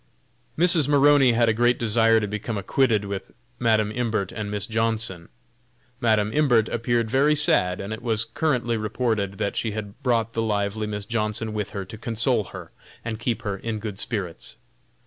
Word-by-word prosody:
Mrs. 170 -3 +4
Maroney 145 -3 +5
had 115 0 +3
a 115 - +3
great 120 +2 +2
desire 115 0 +3
to 105 - -2
become 105 +2 -4
acquainted 105 +1 +1
with 100 -1 -5 0.3
Madam 110 -3 +2
Imbert 110 -5 -1
and 105 -2 -5
Miss 105 -2 -3
Johnson. 110 -6 -1 0.7
Madam 110 -2 +2
Imbert 125 -8 +3
appeared 115 -1 0
very 145 +3 +4
sad, 90 -11 +3
and 100 +2 -5
it 110 - -7
was 115 -2 0
currently 120 -2 0
reported 110 -2 -1
that 100 +1 -3
she 110 -2 -2
had 105 +2 -7
brought 115 -4 0
the 115 - -1
lively 105 0 -1
Miss 105 -1 -4
Johnson 110 0 -2
with 105 -2 -3
her 100 -2 -5
to 105 +3 -10
console 115 -1 0
her - - -10 0.3
and 110 -2 -4
keep 115 +1 -2
her 100 -3 -2
in 110 +2 -4
good 105 -2 -6
spirits. 95 -8 -4
110 Hz, 175 wpm, -24 LUFS, 105-120 Hz, 0.7 s, Maroney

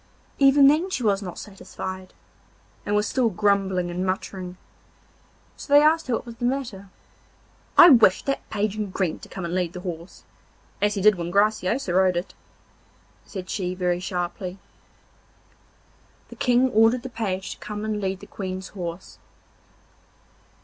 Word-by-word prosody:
Even 275 0 +6
then 315 +6 +3
she 270 -9 -3
was 200 -2 +2
not 180 -3 -7
satisfied, 190 -2 -8 0.8
and 205 - +1
was 210 +1 +1
still 250 -3 +1
grumbling 195 -3 +1
and 180 +1 -3
muttering, 185 -1 -4 1.0
so - - -11
they 290 +1 +7
asked 320 +1 +3
her 245 - +1
what - - -5
was 235 -1 -10
the 240 - -3
matter. 240 -7 -3 0.9
'I 345 - +10
wish 225 -7 +5
that 275 - -3
Page 210 0 -1
in 210 -2 -3
green 185 -3 -2
to - - -13
come 190 - -6
and 170 - -4
lead 180 -2 -1
the 180 - -7
horse, 175 -1 -8 0.6
as 205 +1 +2
he 200 - -2
did 215 -2 +6
when 170 0 -3
Graciosa 200 +1 +1
rode 185 -1 +3
it,' 175 - -4 0.9
said 185 -3 -7
she 185 -3 -3
very 180 -1 0
sharply. 180 0 -3
And - - -29 1.7
the - - -11
King 250 +1 +2
ordered 225 +3 +4
the 260 - -6
Page 195 -5 -3
to - - -8
come 210 0 -6
and 215 -1 -2
lead 190 -1 -3
the - - -10
Queen's 185 -1 -6
horse. 175 -2 -7
200 Hz, 165 wpm, -24 LUFS, 185-230 Hz, 1.7 s, I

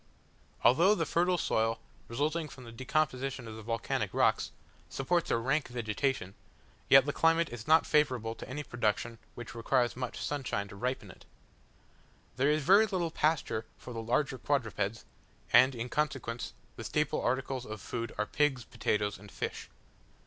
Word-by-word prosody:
Although 170 +11 +6
the 165 - 0
fertile 180 +2 +2
soil, 115 -7 +1 0.3
resulting 150 +6 -1
from 130 - -11
the 115 - -10
decomposition 130 0 -1
of 110 - -7
the 110 - -8
volcanic 115 +1 -2
rocks, - - +2 0.4
supports 170 +5 0
a - - +3
rank 135 +6 0
vegetation, 120 -3 -2 0.6
yet 135 -1 +8
the 145 - -1
climate 165 0 +3
is 120 -2 -8
not 160 +1 +6
favourable 125 -7 +2
to - - -10
any 145 +3 -4
production 115 -2 -1 0.2
which 120 -2 -8
requires 120 +1 +1
much 125 -1 -4
sunshine 130 -8 -2
to - - -10
ripen 125 -2 -3
it. - - -18 1.1
There 135 +3 +3
is 150 0 +2
very 200 +7 +6
little 180 -5 -1
pasture 150 -8 0
for 125 - -9
the 115 - -4
larger 130 +3 0
quadrupeds; 115 -6 -1 0.5
and 130 +3 +7
in 115 +1 -3
consequence, 135 -4 -2 0.2
the - - -6
staple - - 0
articles 130 0 -1
of 110 0 -6
food 115 +3 -4
are 105 - +1
pigs, 135 +1 +1
potatoes, 105 -1 -1
and 100 0 -13
fish. - - -5
130 Hz, 160 wpm, -31 LUFS, 115-150 Hz, 1.1 s, yet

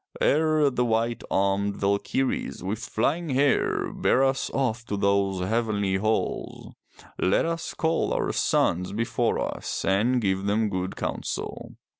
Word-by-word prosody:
Ere 155 -1 +3
the 125 -1 0
white 115 0 0
armed 100 +1 +1
Valkyrs 100 +4 -1
with 100 +4 -2
flying 150 +10 -1
hair 135 +1 +1
bear 130 - +2
us 135 0 +1
off 120 -4 -1
to 100 - -2
those 100 -2 +1
heavenly 105 -3 0
halls, 110 +3 -2 0.5
let 95 - +2
us 165 0 -3
call 165 0 0
our - - 0
sons 90 +3 +1
before 115 +2 0 0.2
us - - -4
and 110 +7 +2
give 95 -3 0
them 105 +1 +1
good 95 0 -3
counsel. - - -4
110 Hz, 135 wpm, -26 LUFS, 100-130 Hz, 0.5 s, Ere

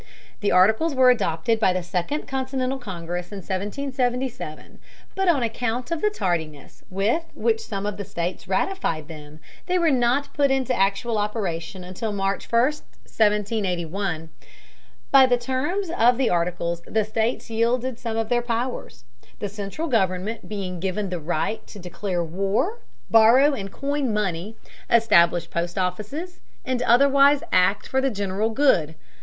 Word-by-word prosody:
The 205 - 0
Articles 220 - +4
were 255 -1 +6
adopted 220 -1 0
by 190 -4 +3
the 185 -1 -2
Second 180 - -3
Continental 265 0 -2
Congress 175 -4 -5
in 205 - -6
1777, 245 - -3 0.3
but 385 -1 -1
on 300 -8 +3
account 240 +4 -2
of 335 - -1
the 425 - +3
tardiness 160 - -3
with 200 - +1
which 450 -1 +1
some 200 - -4
of 205 -1 -3
the 205 - -4
states 180 -2 -4
ratified 185 - -1
them, 155 -1 -11 0.3
they 365 0 +2
were 335 -3 +3
not 255 +2 +1
put 280 -1 +2
into 265 -1 +1
actual 215 +2 +1
operation 190 -4 -3
until 185 +5 -4
March 195 -1 -2
1, 230 - +4
1781. 205 - -1 0.8
By 270 -1 +8
the 245 -1 +3
terms 290 +10 -2
of 240 +1 +4
the 260 -2 +1
Articles 170 0 -1
the 220 -1 0
states 225 +2 -2
yielded 235 +2 0
some 225 -2 -3
of 225 -1 -1
their 240 0 +2
powers, 240 - -4 0.3
the 205 - -4
central 205 - -5
government 205 - -1
being 190 -4 -4
given 190 +2 -2
the 180 - -2
right 175 +7 -2
to - - -11
declare 180 -1 -3
war, 200 - -1 0.3
borrow 235 +6 +6
and 195 -7 -5
coin 280 -1 -1
money, 205 0 -2 0.3
establish 175 -7 +4
post 170 +2 -3
offices, 215 - -3 0.3
and 255 -2 -1
otherwise 275 +3 +5
act 185 +3 +3
for 265 - +1
the 270 - +2
general 205 -1 -1
good. 220 - +2
215 Hz, 150 wpm, -24 LUFS, 185-260 Hz, 0.8 s, By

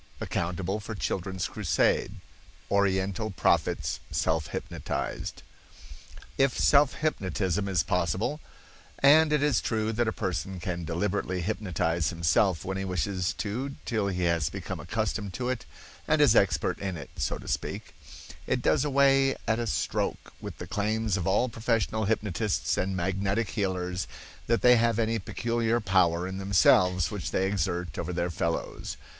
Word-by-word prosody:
—Accountable 90 +4 -2
for 110 +1 -6
Children's 95 -1 -2
Crusade.—Oriental 100 +1 -1
Prophets 95 - +1
Self 80 -2 0
Hypnotized. - - -4 1.0
If 135 -1 +3
self 140 -1 +5
hypnotism 95 - 0
is 90 -5 +1
possible 100 - 0 0.6
(and 150 +3 +6
it 150 -1 +2
is 150 -2 +2
true 110 -1 -1
that 120 +1 +1
a - - +2
person 95 -2 -3
can 85 -1 -4
deliberately 90 +2 -1
hypnotize 85 -5 -1
himself 85 +2 +1
when 95 0 -3
he 95 - -2
wishes 90 0 -1
to 125 +7 -4
till 110 -4 0
he 90 -2 -1
has 85 -4 +1
become - - -6
accustomed 100 -3 -2
to 125 0 -2
it 130 -3 -3 0.4
and - - +3
is - - +6
expert - - +2
in 95 -3 -3
it, 70 - -9
so - - -1
to - - -12
speak), - - -3 0.5
it - - 0
does - - +3
away 135 -1 +4
at 110 +1 +2
a 120 - -2
stroke - - -2
with - - -7
the - - -6
claims 110 0 0
of 90 -4 -2
all 105 +6 +3
professional 115 -2 0
hypnotists 100 -8 0
and 95 +1 -1
magnetic 95 +4 -1
healers 90 -3 -2 0.4
that 115 0 +1
they 125 0 +7
have 115 -1 +2
any 115 0 +1
peculiar 115 +3 0
power 90 -4 +2
in 95 +1 -5
themselves 90 -2 +4
which 100 -4 -4
they 95 - +1
exert 90 -2 -2
over - - -3
their 90 0 -1
fellows. 85 0 -3
100 Hz, 150 wpm, -28 LUFS, 90-115 Hz, 1.0 s, they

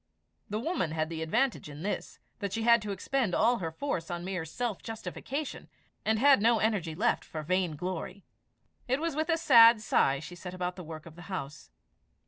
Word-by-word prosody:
The 210 +1 -2
woman 235 - -1
had 155 0 -1
the 160 -1 -4
advantage 230 - 0
in 145 +2 -9
this, 205 - -3 0.2
that 200 -2 -3
she 225 - -1
had 235 0 +6
to 210 -1 -4
expend 225 0 -1
all 235 +2 +3
her 165 -3 -2
force 165 - -3
on 175 0 -4
mere 185 -3 -3
self 225 +6 -3
justification, 260 +5 -5 0.3
and 220 0 +2
had 270 -1 +6
no 230 +1 +4
energy 205 -8 0
left 230 +8 +1
for 155 -1 -6
vain 180 0 0
glory. 180 +3 -5 0.6
It 260 +2 +1
was 330 -2 -2
with 315 +2 -1
a 330 - +3
sad 230 -7 +7
sigh 140 -9 +2
she 160 +4 -9
set 180 +1 -8
about 180 0 -3
the 180 - -8
work 160 -1 -8
of 165 -2 -12
the 175 - -11
house. 150 -6 -6
195 Hz, 200 wpm, -30 LUFS, 165-235 Hz, 0.6 s, sad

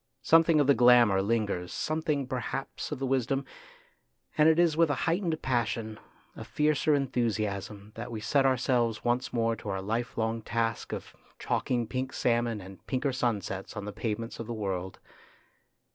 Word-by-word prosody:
Something 165 -1 +5
of 145 - +4
the 140 - +6
glamour 120 -5 +6
lingers, 100 -4 -1
something 155 -3 -1
perhaps 130 +3 -4
of 150 - -2
the 135 - -2
wisdom, 135 +1 0 0.9
and 155 +1 +6
it 160 - +4
is 170 -3 +4
with 165 -1 +4
a 145 - +1
heightened 165 -1 0
passion, 115 -3 -1 0.4
a - - -7
fiercer 150 0 +2
enthusiasm, 110 -6 -2
that 120 +2 -7
we 110 - -4
set 135 +6 +2
ourselves 125 -4 +1
once 120 +1 0
more 115 -1 +1
to 105 - -7
our 95 -1 -2
life 115 +5 -3
long 115 0 -1
task 115 0 -2
of - - -6 0.2
chalking 120 -2 -1
pink 130 +3 -3
salmon 115 -3 0
and 95 -2 -12
pinker 135 0 -1
sun 120 -5 0
sets 95 +2 -6
on 105 - -4
the 105 - -6
pavements 115 +1 -4
of 115 - -5
the 120 - -4
world. 95 -3 -3
120 Hz, 170 wpm, -29 LUFS, 110-135 Hz, 0.9 s, the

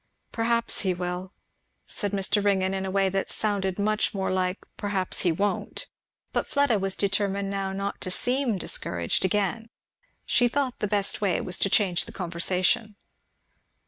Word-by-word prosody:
"Perhaps 235 0 +1
he 185 -3 +1
will," 180 +1 -4 0.5
said 205 -3 -3
Mr. 200 +1 +1
Ringgan, 190 -2 +2
in 190 0 -2
a - - -2
way 195 0 +2
that 195 +1 -1
sounded 195 -3 -1
much 215 +1 +1
more 190 -1 0
like 185 0 0 0.2
"Perhaps 195 -3 -1
he 175 - +3
won't!" 200 +5 -1 0.4
But - - 0
Fleda 280 -7 +2
was 195 0 -1
determined 200 0 0
now 195 -1 -2
not 195 +1 -3
to 185 - -2
seem 245 +3 0
discouraged 85 - -1
again. 210 +4 0 0.6
She 245 - +4
thought 260 0 -1
the 210 - 0
best 200 0 +2
way 195 -4 +2
was 180 - 0
to 195 - +2
change 185 -4 +3
the - - -9
conversation. 185 +4 0
195 Hz, 160 wpm, -27 LUFS, 185-210 Hz, 0.6 s, She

